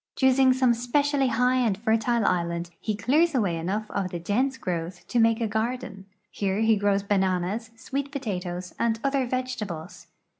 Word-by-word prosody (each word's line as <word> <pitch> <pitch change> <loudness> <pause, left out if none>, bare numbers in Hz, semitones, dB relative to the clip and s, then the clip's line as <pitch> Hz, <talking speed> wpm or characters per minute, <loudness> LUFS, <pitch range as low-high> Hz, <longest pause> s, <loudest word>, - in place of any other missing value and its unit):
Choosing 265 0 +4
some 255 -1 +3
specially 275 +4 +1
high 250 +2 +2
and 225 -6 +1
fertile 225 +1 +1
island, 170 -1 0
he 215 - -2
clears 290 +10 +2
away 200 -9 +1
enough 195 +6 -2
of 195 -2 -1
the 175 - -4
dense 250 +10 0
growth 175 -2 -4
to 245 - +1
make 225 0 +4
a 230 - 0
garden. 220 -2 -3 0.2
Here 195 +1 -1
he 225 0 +4
grows 200 -1 +1
bananas, 195 +2 0
sweet 275 +4 -4
potatoes, 180 - -4
and 225 -1 +1
other 275 -2 +1
vegetables. 240 -10 -4
225 Hz, 160 wpm, -26 LUFS, 190-255 Hz, 0.2 s, Choosing